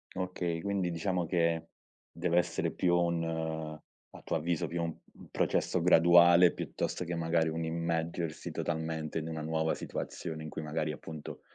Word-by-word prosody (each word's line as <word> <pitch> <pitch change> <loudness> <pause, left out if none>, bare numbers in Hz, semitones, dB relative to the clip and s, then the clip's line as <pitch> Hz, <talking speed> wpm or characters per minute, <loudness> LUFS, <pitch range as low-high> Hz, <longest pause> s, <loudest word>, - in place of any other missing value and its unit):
Okay, 90 -2 -2
quindi 100 -1 0
diciamo 85 +1 -1
che 85 -1 +1 0.4
deve 85 0 0
essere 90 -1 +1
più 90 -1 +2
un 80 -2 -1 0.3
a - - -12
tuo - - -2
avviso, 85 +1 -1
più 85 0 -2
un 85 -1 -3 0.3
processo 90 - +1
graduale 85 0 +7
piuttosto - - -3
che 85 - -3
magari 80 -1 +1
un 80 +1 -2
immergersi 85 0 -2
totalmente 80 -1 -2
in 80 - -5
una 80 -1 -4
nuova 80 +1 0
situazione 80 -1 -5
in 80 - -6
cui 80 - -5
magari, 75 0 -1
appunto, 75 0 -8
85 Hz, 150 wpm, -31 LUFS, 80-85 Hz, 0.4 s, graduale